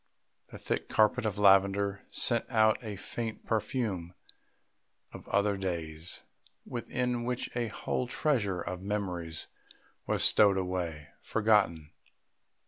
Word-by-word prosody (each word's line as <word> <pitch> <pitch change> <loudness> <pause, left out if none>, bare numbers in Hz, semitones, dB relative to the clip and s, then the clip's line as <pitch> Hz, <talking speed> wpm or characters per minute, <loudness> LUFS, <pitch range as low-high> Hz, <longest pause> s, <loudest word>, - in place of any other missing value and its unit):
The - - -9
thick - - -3
carpet 110 +2 +3
of 105 -1 -3
lavender 100 0 +4
sent 115 -1 +1
out 110 -1 +3
a 105 -3 -5
faint 110 +3 -5
perfume 105 -6 -2 1.0
of - - -10
other 100 0 +1
days, 85 -3 -4 0.4
within 125 0 -2
which 125 0 -3
a 120 -1 0
whole 125 +3 -2
treasure 115 - 0
of 90 +1 -5
memories 90 -5 -3 0.6
was - - +1
stowed 100 -2 +5
away... 90 -5 -3
forgotten. 105 -9 +2
100 Hz, 115 wpm, -30 LUFS, 90-115 Hz, 1.0 s, stowed